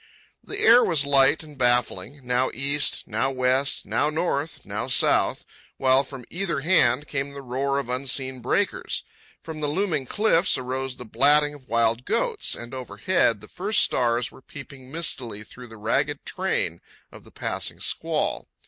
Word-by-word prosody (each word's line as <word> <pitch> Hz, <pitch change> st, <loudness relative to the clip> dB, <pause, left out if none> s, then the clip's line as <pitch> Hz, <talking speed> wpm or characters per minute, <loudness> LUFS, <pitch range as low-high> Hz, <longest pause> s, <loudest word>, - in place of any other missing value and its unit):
The 405 Hz, -, -6 dB
air 245 Hz, -, +7 dB
was 155 Hz, -5 st, +2 dB
light 140 Hz, +2 st, +4 dB
and 150 Hz, -3 st, -14 dB
baffling, 125 Hz, +2 st, 0 dB
now 125 Hz, +1 st, +1 dB
east, 140 Hz, +2 st, 0 dB
now 115 Hz, +5 st, 0 dB
west, 130 Hz, +1 st, +1 dB
now 150 Hz, -, +1 dB
north, 155 Hz, -1 st, -2 dB
now 105 Hz, +4 st, -4 dB
south; 130 Hz, -, +2 dB, 0.3 s
while 130 Hz, +1 st, +4 dB
from 130 Hz, -3 st, -9 dB
either 180 Hz, -4 st, -2 dB
hand 145 Hz, -4 st, +3 dB
came 140 Hz, -1 st, -2 dB
the 140 Hz, 0 st, -9 dB
roar 135 Hz, +2 st, -1 dB
of 140 Hz, -3 st, -2 dB
unseen 130 Hz, 0 st, -1 dB
breakers. -, -, -1 dB, 0.4 s
From 160 Hz, -1 st, -7 dB
the 150 Hz, -, +1 dB
looming 155 Hz, -4 st, 0 dB
cliffs 195 Hz, -, +2 dB
arose 130 Hz, 0 st, -3 dB
the 125 Hz, -, -9 dB
blatting 145 Hz, +6 st, +3 dB
of 140 Hz, -3 st, -15 dB
wild 115 Hz, +1 st, +2 dB
goats, 470 Hz, -4 st, 0 dB
and 120 Hz, +2 st, -9 dB
overhead 130 Hz, -2 st, 0 dB
the -, -, -11 dB
first -, -, +1 dB
stars 120 Hz, -1 st, 0 dB
were -, -, -16 dB
peeping 135 Hz, -1 st, -12 dB
mistily 125 Hz, -9 st, -1 dB
through 125 Hz, +3 st, -12 dB
the 115 Hz, -1 st, -12 dB
ragged 140 Hz, +7 st, -1 dB
train 180 Hz, -, -2 dB, 0.3 s
of -, -, -13 dB
the -, -, -16 dB
passing -, -, -4 dB
squall. -, -, -1 dB
135 Hz, 160 wpm, -24 LUFS, 125-150 Hz, 0.4 s, air